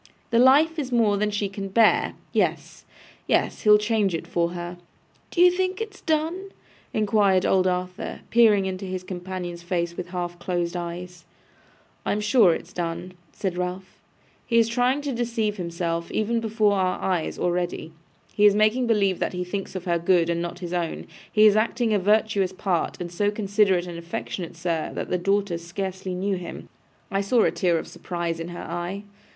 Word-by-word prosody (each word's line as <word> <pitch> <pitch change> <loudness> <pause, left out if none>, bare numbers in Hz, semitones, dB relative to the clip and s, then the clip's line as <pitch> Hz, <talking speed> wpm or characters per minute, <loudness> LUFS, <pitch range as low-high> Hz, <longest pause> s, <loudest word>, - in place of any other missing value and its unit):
The 230 - +4
life 300 +6 +5
is 265 -3 -3
more 225 -4 +3
than 210 +1 +1
she 205 -1 -1
can 195 0 -6
bear. 220 +3 +3 0.2
Yes, - - -1 0.4
yes. - - +1
He'll 210 -1 +7
change 210 -3 +1
it 165 - -4
for 170 0 -1
her.' 175 0 -6 0.5
'D'ye 360 0 +5
think 370 +1 -1
it's 435 -3 -6
done?' 330 +5 -1 0.4
inquired 205 -3 +2
old 185 -1 +3
Arthur, 180 0 -3
peering 215 -4 +5
into 190 0 -4
his 185 -1 -4
companion's 180 -1 -6
face 170 -1 -2
with 180 - -5
half 175 -1 -4
closed 175 -1 -2
eyes. 175 0 -6 0.8
'I - - 0
am 210 - -1
sure 210 -2 +5
it's 170 - -9
done,' 175 +1 -4 0.2
said 185 -3 -3
Ralph. 180 +1 -5 0.5
'He 230 - +2
is 230 -1 +5
trying 250 +4 +1
to 285 -2 -3
deceive 230 -3 -1
himself, 170 -1 -3
even 230 +2 0
before 215 -2 +2
our 185 -1 0
eyes, 180 -4 -1
already. 175 -2 -2 0.4
He 210 0 +6
is 205 - +4
making 215 +4 +3
believe 200 -5 +2
that - - -1
he 180 0 -2
thinks 195 +2 -5
of 185 0 -5
her 170 -1 +1
good 170 -1 +3
and 170 0 -1
not 175 0 -4
his 175 - -5
own. 170 -2 -2 0.3
He 215 0 +5
is 210 -1 +6
acting 230 +1 +1
a 205 - +3
virtuous 205 -1 +2
part, 185 -3 -1
and 175 -1 -5
so 205 +4 +1
considerate 200 -3 +2
and 170 -1 -7
affectionate, 170 0 -5
sir, 165 -2 -2
that - - -4
the 180 - +1
daughter 195 -1 0
scarcely 185 +2 -5
knew 195 +1 -1
him. 180 - -8 0.4
I 195 0 +1
saw 225 +4 +3
a - - +3
tear 175 -4 +1
of - - -5
surprise 170 -2 -4
in 165 - -4
her 175 0 -7
eye. 175 +4 -4
190 Hz, 185 wpm, -24 LUFS, 175-215 Hz, 0.8 s, He'll